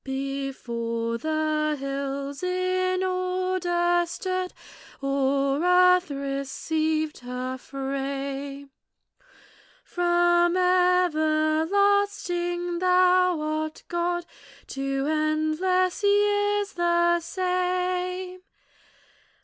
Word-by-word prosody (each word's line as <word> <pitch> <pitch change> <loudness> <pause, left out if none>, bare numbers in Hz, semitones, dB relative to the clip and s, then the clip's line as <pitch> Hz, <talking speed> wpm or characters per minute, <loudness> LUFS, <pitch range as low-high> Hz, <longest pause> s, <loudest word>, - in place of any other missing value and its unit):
Before 245 -4 -3
the 310 0 0
hills 275 0 -4
in 370 0 0
order 365 -1 0
stood, 370 +1 -3 0.5
Or 275 +1 0
earth 360 0 +5
received 300 +3 -2
her 250 +1 -5
frame, 275 +1 -5 1.1
From 345 0 +2
everlasting 350 +1 +1
thou 365 -2 +3
art 310 0 -3
God, 345 0 -1 0.4
To 275 0 -2
endless 310 +5 0
years 410 0 +2
the 345 0 +2
same. 365 0 -2
345 Hz, 65 wpm, -25 LUFS, 280-365 Hz, 1.1 s, earth